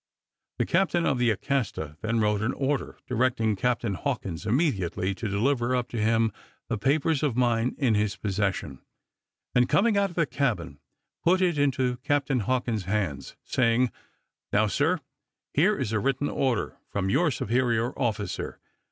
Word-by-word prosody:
The - - +1
captain 175 -1 +2
of 130 - +1
the 120 -1 +3
Acasta 110 - -1
then 115 +1 0
wrote 105 -1 +2
an 115 +3 0
order, 140 +1 -2
directing 120 -3 +1
Captain 120 0 0
Hawkins 85 0 -3
immediately 100 - 0
to 110 +3 -4
deliver 120 +4 +1
up 125 -1 -1
to 115 - -3
him 115 0 +2 0.4
the - - 0
papers 145 +5 +2
of 140 -6 0
mine 120 0 +2
in 130 -6 +2
his 105 -1 +1
possession; 95 -9 -2 0.7
and 125 0 +3
coming 215 0 +3
out 200 0 +2
of 175 - -13
the 165 - +2
cabin, 105 - -2 0.4
put 180 +2 +4
it 175 -5 +2
into 130 -3 +1
Captain 140 0 0
Hawkins' 115 -3 -1
hands, 95 -8 -2
saying, 120 0 +2 0.6
"Now, 105 +1 +3
sir, 150 - +1 0.5
here 190 +8 +3
is 130 -6 -2
a 110 - +1
written 135 +4 0
order 130 -3 -1
from 95 -1 -1
your 175 - +3
superior 120 -1 0
officer. 110 -5 -2
120 Hz, 155 wpm, -27 LUFS, 105-140 Hz, 0.7 s, put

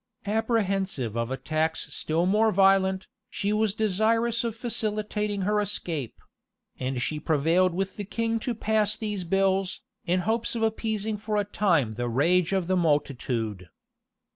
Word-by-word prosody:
[*] 235 - -38
Apprehensive 195 - 0
of 115 0 -1
attacks 155 +4 -2
still 165 +3 0
more 215 +4 +3
violent, 190 -1 +3 0.2
she 205 +1 -1
was 215 -1 +1
desirous 225 +3 +1
of 230 -2 -2
facilitating 210 -3 -2
her 210 +2 +2
escape; 170 - -2 0.6
and 130 0 -2
she 155 - -2
prevailed 165 +4 +2
with 195 +1 -2
the 205 - -3
king 230 +3 -1
to 240 +1 -3
pass 215 -1 +1
these 210 -4 -3
bills, 195 +1 +1 0.3
in 180 +1 +2
hopes 225 +5 -1
of 225 - -1
appeasing 220 -1 -1
for 210 0 -2
a 205 - +1
time 175 - +1
the 120 +2 -3
rage 165 +9 +2
of 190 -2 +1
the 185 +2 +1
multitude. 120 - -1
195 Hz, 150 wpm, -27 LUFS, 160-215 Hz, 0.6 s, more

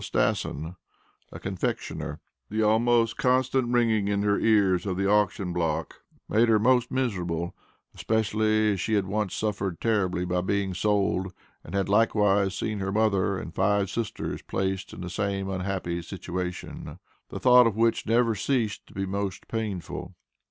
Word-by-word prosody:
Stasson, 80 +5 -1 0.5
a - - -8
confectioner. 85 -5 -4 0.3
The 110 +1 0
almost 115 +1 +3
constant 130 0 +2
ringing 115 -4 +2
in 100 0 0
her 100 -1 +2
ears 100 -4 +3
of 95 -2 -2
the 100 0 +1
auction 100 -3 +1
block, 80 -2 -2 0.3
made 115 +2 +3
her 110 - +5
most 125 +2 +3
miserable, 90 -10 -2 0.4
especially 110 -1 +1
as 95 - -4
she 110 - 0
had 100 -2 +1
once 105 0 -2
suffered 100 -5 -2
terribly 95 -6 0
by 90 0 0
being 95 0 -1
sold, 95 -1 0 0.3
and - - -7
had 100 -1 +1
likewise 100 -2 +3
seen 105 -2 -2
her 95 0 -2
mother, 100 -2 +1
and 80 - -7
five 100 +1 +1
sisters 115 +2 -3
placed 95 -1 -3
in - - -9
the 90 - -5
same 100 0 -2
unhappy 90 -2 -2
situation, 90 0 -6 0.3
the - - -6
thought 125 -1 +7
of 110 - -1
which 115 0 +1
never 115 +1 +3
ceased 110 0 -1
to - - -18
be 95 0 -1
most 95 0 -4
painful. 105 -6 -4
100 Hz, 155 wpm, -26 LUFS, 95-110 Hz, 0.5 s, thought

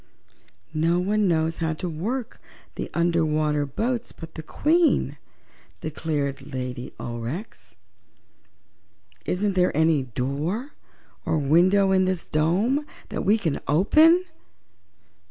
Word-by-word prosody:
"No 165 +2 +2
one 205 +3 +1
knows 160 -1 +1
how 160 -1 -1
to 180 - -4
work 220 +10 -4 0.3
the - - -5
under 170 -1 +2
water 150 -1 +1
boats 235 - -2
but 165 -1 -11
the 160 - -6
Queen," 320 - +2 0.6
declared 145 -3 -3
Lady 125 -1 -5
Aurex. 120 - -6 1.5
"Isn't 200 +2 0
there 180 -5 +2
any 160 -2 +3
door 140 - -3 0.5
or - - 0
window 180 +7 +4
in 190 -1 +4
this 185 -2 -1
dome 200 - +1 0.2
that - - -3
we 205 +4 +4
could 165 -9 -2
open?" 310 - +5
165 Hz, 115 wpm, -24 LUFS, 150-205 Hz, 1.5 s, open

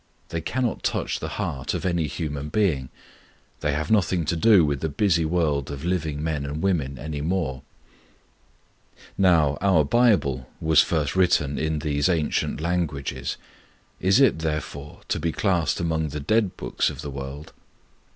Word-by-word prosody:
They 85 0 -3
cannot 120 +8 -1
touch - - -1
the - - -4
heart 65 0 -2
of - - -4
any 85 -4 +1
human 75 0 -4
being; 75 -10 +1 0.7
they 75 - 0
have 75 +5 -2
nothing 90 -5 +2
to 85 - 0
do 95 0 +5
with 70 -2 -1
the 80 - -2
busy 85 +1 +2
world 80 -5 0
of 70 +2 -6
living 80 -5 -1
men 80 -3 -1
and 70 +2 -4
women 75 -9 0
any 75 +1 -5
more. 80 -6 -1 1.5
Now, 80 -7 +3
our 95 -6 +4
Bible 70 - +2
was 80 0 +5
first 75 -3 -1
written 85 -6 +2
in 80 0 0
these 75 +1 0
ancient 80 -4 0
languages: 80 -4 -2 0.6
is 95 +5 +3
it, 135 -11 +4
therefore, 75 -2 -4
to - - 0
be 80 +1 -1
classed 85 -4 0
among 80 -2 0
the 75 +2 -5
'dead' 105 +6 +1
books - - 0
of 75 0 -8
the 70 - -5
world? 70 +2 -7
80 Hz, 160 wpm, -24 LUFS, 70-90 Hz, 1.5 s, do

